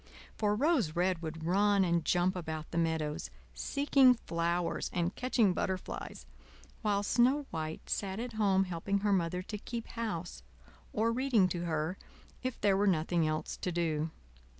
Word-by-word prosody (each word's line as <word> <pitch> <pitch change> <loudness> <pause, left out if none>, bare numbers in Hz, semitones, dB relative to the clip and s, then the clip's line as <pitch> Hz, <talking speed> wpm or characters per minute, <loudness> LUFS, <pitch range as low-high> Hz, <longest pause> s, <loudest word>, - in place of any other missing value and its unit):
For 210 -1 +1
Rose 250 - +2
Red 180 -1 +1
would 160 0 -5
run 200 +2 +3
and 170 -1 +1
jump 180 +1 +2
about 160 -3 -5
the 170 - -3
meadows, 160 -2 -1 0.2
seeking 270 - +4
flowers 170 -4 -1
and 175 0 0
catching 240 -6 +2
butterflies, 185 +1 -4 0.6
while 205 -2 +1
Snow 255 +7 +3
White 160 -1 -5
sat 195 0 -2
at 240 0 -4
home 200 -3 +3
helping 190 +2 -2
her 205 -1 +2
Mother 180 0 0
to 210 +2 -6
keep 230 +2 -5
house, 210 -7 -4 0.5
or 225 +2 +1
reading 240 -5 +3
to 175 -1 -3
her 160 +2 -2 0.4
if 255 -2 -3
there 200 -2 +4
were 205 +1 +2
nothing 170 -2 +2
else 155 0 -2
to 180 - -3
do. 165 -2 0
185 Hz, 155 wpm, -32 LUFS, 165-215 Hz, 0.6 s, seeking